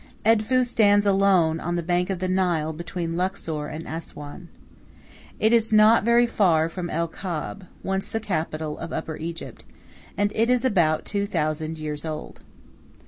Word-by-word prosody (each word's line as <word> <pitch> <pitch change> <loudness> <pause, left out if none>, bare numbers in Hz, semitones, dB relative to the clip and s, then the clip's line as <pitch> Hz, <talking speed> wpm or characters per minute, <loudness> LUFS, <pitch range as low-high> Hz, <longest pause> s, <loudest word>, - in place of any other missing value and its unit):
Edfu 225 +3 +3
stands 205 -4 +3
alone 190 -5 +3
on 175 +2 -2
the 170 - -1
bank 180 +2 0
of 190 - -1
the 185 +1 -2
Nile 175 -4 0
between 170 +1 -4
Luxor 165 -5 -2
and 155 +2 -7
Assuan. 160 +1 -8 0.9
It 220 +2 +3
is 225 -1 +3
not 215 +1 +6
very 235 +2 +4
far 170 -8 +2
from 175 0 -5
El 170 +1 -1
Kab, 180 +2 -6 0.2
once 190 0 -2
the 225 - -2
capital 155 -6 -3
of - - -6
Upper 160 -1 -4
Egypt, 165 +1 -7 0.5
and 205 0 +1
it 225 +2 +1
is 250 +1 +2
about 170 -10 +2
two 200 0 -1
thousand 155 -3 -2
years 150 -1 -5
old. 155 -1 -6
180 Hz, 160 wpm, -24 LUFS, 160-205 Hz, 0.9 s, not